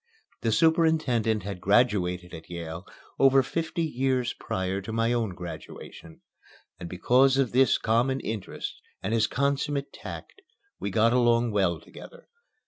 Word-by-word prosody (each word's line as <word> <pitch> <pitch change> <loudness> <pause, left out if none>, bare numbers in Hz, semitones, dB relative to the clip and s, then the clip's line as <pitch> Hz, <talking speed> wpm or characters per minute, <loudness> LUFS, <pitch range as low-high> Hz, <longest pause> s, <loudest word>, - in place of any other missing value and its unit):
The 115 - 0
superintendent 130 - +2
had 95 -2 -6
graduated 90 -5 +1
at 80 -1 -10
Yale 85 +1 -7 0.3
over 135 0 +5
fifty 165 +4 -2
years 130 -4 0
prior 95 +1 -3
to 100 - -7
my 115 +1 +1
own 110 -6 -1
graduation, 80 -1 -10 0.6
and 85 - -7
because 130 +9 +3
of 135 -4 +1
this 130 0 +4
common 120 +4 +1
interest 110 -6 -6 0.2
and 105 - -1
his 110 -2 +3
consummate 140 +1 -1
tact 390 - -9 0.4
we - - -3
got 115 +1 +3
along 120 -1 +3
well 95 -5 +1
together. - - -14
115 Hz, 135 wpm, -27 LUFS, 95-135 Hz, 0.6 s, over